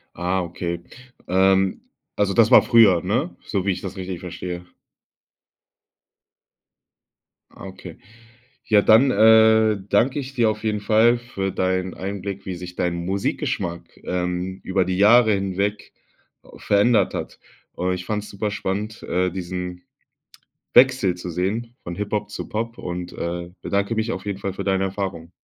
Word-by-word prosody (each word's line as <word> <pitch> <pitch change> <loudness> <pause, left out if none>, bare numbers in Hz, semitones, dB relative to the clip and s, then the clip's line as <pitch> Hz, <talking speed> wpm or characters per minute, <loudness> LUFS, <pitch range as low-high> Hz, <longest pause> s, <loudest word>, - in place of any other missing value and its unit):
Ah 90 +2 -1
okay. 85 0 -4 0.5
Ähm, 95 +1 +2 0.3
also 100 -1 +1
das 110 +2 +4
war - - +9
früher, 110 -8 +5
ne? 120 - -1
So 100 -2 -2
wie 100 - +2
ich 90 - -4
das 95 -1 -6
richtig 95 -2 -5
verstehe. 90 0 -6 2.9
Ah - - -12
okay. 95 -3 -10 0.7
Ja, 105 -2 +4
dann, 115 +5 +6
äh, 110 -1 +5
danke 125 +7 +2
ich 135 -1 -7
dir 115 -3 +3
auf 105 0 -8
jeden 105 -1 0
Fall 110 +3 +4
für 100 -5 -4
deinen 95 0 -1
Einblick, 100 0 -5
wie 95 - -4
sich 90 0 -9
dein 90 -1 -1
Musikgeschmack, 90 -2 -3
ähm, 90 +1 -3
über 95 -1 0
die 90 0 -2
Jahre 110 +2 +6
hinweg 100 +1 -2 0.7
verändert 105 +3 +2
hat. - - -6 0.4
Äh, 90 +1 0
ich 90 -1 -7
fand's 105 0 -3
superspannend, 105 +1 -3
äh, 90 0 0
diesen 90 0 -5 0.9
Wechsel 125 -8 +5
zu 90 0 -6
sehen 105 +8 -2
von 85 0 -6
Hip-Hop 105 +1 -3
zu - - -6
Pop 115 +2 -4
und, 90 0 -5
äh, 85 0 -4
bedanke 100 +2 -1
mich 110 +1 -1
auf 95 - -6
jeden 100 -2 -3
Fall 100 -1 -3
für - - -6
deine 95 -1 +1
Erfahrung. 95 -4 -4
95 Hz, 145 wpm, -22 LUFS, 90-110 Hz, 2.9 s, war